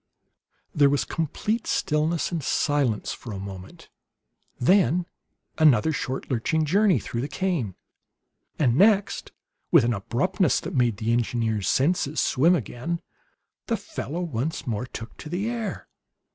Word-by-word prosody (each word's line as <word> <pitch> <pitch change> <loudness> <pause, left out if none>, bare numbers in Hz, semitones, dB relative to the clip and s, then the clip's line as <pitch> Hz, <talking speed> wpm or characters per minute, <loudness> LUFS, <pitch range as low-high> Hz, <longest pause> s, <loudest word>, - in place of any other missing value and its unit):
There 145 -2 +5
was 145 0 +1
complete 210 +8 -2
stillness 155 +3 0
and 170 -2 -2
silence 135 -7 0
for 120 - -9
a 100 - -5
moment, 95 -1 -9 0.7
then 180 +3 +3 0.5
another 155 0 +5
short 130 -2 -3
lurching 155 +6 +1
journey 195 +1 +3
through 115 +2 -4
the 135 - -2
cane; 150 - -2 0.8
and 125 -6 +2
next, 200 +4 +3 0.4
with - - +6
an 120 +1 +1
abruptness 165 - +1
that - - -6
made 120 -5 +2
the 115 +1 0
engineer's 115 -3 0
senses 150 +1 +1
swim 160 +7 +3
again, 160 - -3 0.7
the - - 0
fellow 165 +6 -5
once 155 -2 -3
more 120 +1 -2
took 115 -2 -8
to 150 - -9
the 185 +6 -2
air. 230 -2 -4
145 Hz, 135 wpm, -25 LUFS, 120-175 Hz, 0.8 s, with